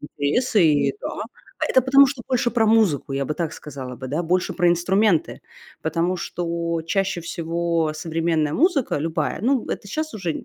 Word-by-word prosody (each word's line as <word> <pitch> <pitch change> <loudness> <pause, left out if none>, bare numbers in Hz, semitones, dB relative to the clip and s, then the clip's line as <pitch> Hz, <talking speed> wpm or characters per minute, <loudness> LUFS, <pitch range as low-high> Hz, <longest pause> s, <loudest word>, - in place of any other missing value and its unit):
интересы, 175 - +1
и 150 -2 +3
да. - - -4 0.5
А - - 0
это 260 - +5
потому 275 +2 +6
что 265 -2 -5
больше 250 -2 +1
про 225 -2 +2
музыку, 215 -12 +2
я 135 0 -1
бы 150 - -3
так 165 -2 -3
сказала 130 -4 -8
бы, 130 - -7 0.2
больше 180 +2 0
про 175 - +2
инструменты. 175 +1 +2 0.4
Потому 170 +3 0
что 170 -1 -3
чаще 195 0 0
всего 165 -1 -1
современная 160 -1 -1
музыка 295 - +1
любая, 160 +1 -2
ну, 255 +1 +1
это - - -4
сейчас 310 +9 -3
уже 180 -7 -4
170 Hz, 165 wpm, -22 LUFS, 160-220 Hz, 0.5 s, потому